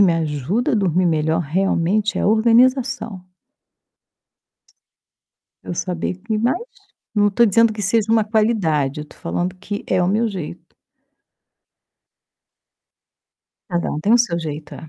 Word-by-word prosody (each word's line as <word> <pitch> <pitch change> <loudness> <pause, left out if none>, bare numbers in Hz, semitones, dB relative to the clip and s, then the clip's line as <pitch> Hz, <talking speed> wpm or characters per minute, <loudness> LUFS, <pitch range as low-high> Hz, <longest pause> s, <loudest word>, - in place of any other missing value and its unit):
me 185 -4 +5
ajuda 165 - -1
a - - +2
dormir 185 -2 +1
melhor, 160 +1 +1
realmente, 190 +5 0
é - - 0
organização. 235 0 +2 2.4
Eu - - -5
saber 180 0 -3
que 215 +3 -3
mas, 240 +8 +1 0.6
não 205 -1 +3
estou 235 +4 +3
dizendo 230 +2 +4
que 210 -1 -6
seja 220 +2 +1
uma 220 -2 +3
qualidade, 190 - 0
estou 150 - -12
falando 180 +1 -3
que 205 +2 -6
é 185 -1 +1
o 180 - +1
meu 220 +4 +1
jeito. 180 -4 -8 3.0
Cada 175 0 -1
um 150 - -3
tem 210 +8 +3
o - - +6
seu 200 -8 +1
jeito, 150 -1 -6
é. 160 - -10
195 Hz, 135 wpm, -20 LUFS, 165-220 Hz, 3.0 s, o